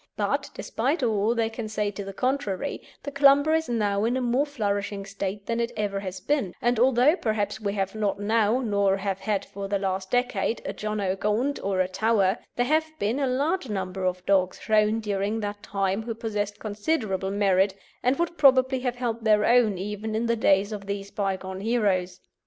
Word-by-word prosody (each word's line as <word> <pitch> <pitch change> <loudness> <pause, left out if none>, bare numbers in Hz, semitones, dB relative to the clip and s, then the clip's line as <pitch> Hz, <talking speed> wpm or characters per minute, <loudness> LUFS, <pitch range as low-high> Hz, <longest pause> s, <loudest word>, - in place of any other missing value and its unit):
But, - - -1
despite 270 +7 -1
all 220 0 +1
they 230 -1 +1
can 225 -1 -5
say 210 -1 -1
to 200 0 -6
the 195 - -6
contrary, 255 +1 -2 0.2
the 285 - -5
Clumber 280 +2 +5
is 320 -2 +1
now 205 -3 +1
in 240 +3 +1
a - - 0
more 250 +4 +1
flourishing 205 -6 -2
state 200 0 -5
than 230 0 -1
it 235 0 -1
ever 205 -2 -1
has 185 -1 -6
been; 240 -3 -1
and 240 -1 +1
although 260 +5 +5
perhaps 215 - -2
we 200 -1 -1
have 195 -2 -2
not 205 -2 -1
now, 220 +3 +2
nor 200 -4 +2
have 195 -1 -2
had 205 0 -1
for 200 0 -6
the 200 0 0
last 190 -1 -2
decade, 245 -2 0
a - - -3
John 215 0 -3
o' 190 -1 0
Gaunt 220 +8 0
or 190 -1 +1
a 185 - +1
Tower, 200 +1 +1 0.2
there 245 - +1
have 315 +4 +2
been 230 +2 0
a 275 - +1
large 280 +3 0
number 190 -2 -3
of 180 0 -2
dogs 185 -2 +2
shown 215 +2 +2
during 205 +1 -1
that 205 0 -4
time 195 +1 -1
who 230 0 -5
possessed 210 -3 -3
considerable 205 -3 -2
merit 195 -1 +2 0.3
and 255 +2 +2
would 340 -1 -2
probably 260 -2 +5
have 250 -1 -2
held 235 -2 -3
their 210 -1 +4
own 235 -5 +4
even 210 +3 -4
in 225 +2 0
the 235 0 +2
days 200 -2 +3
of 200 -2 -6
these 200 0 -4
bygone 190 -2 -3
heroes. 195 -5 0
210 Hz, 200 wpm, -26 LUFS, 195-240 Hz, 0.3 s, Clumber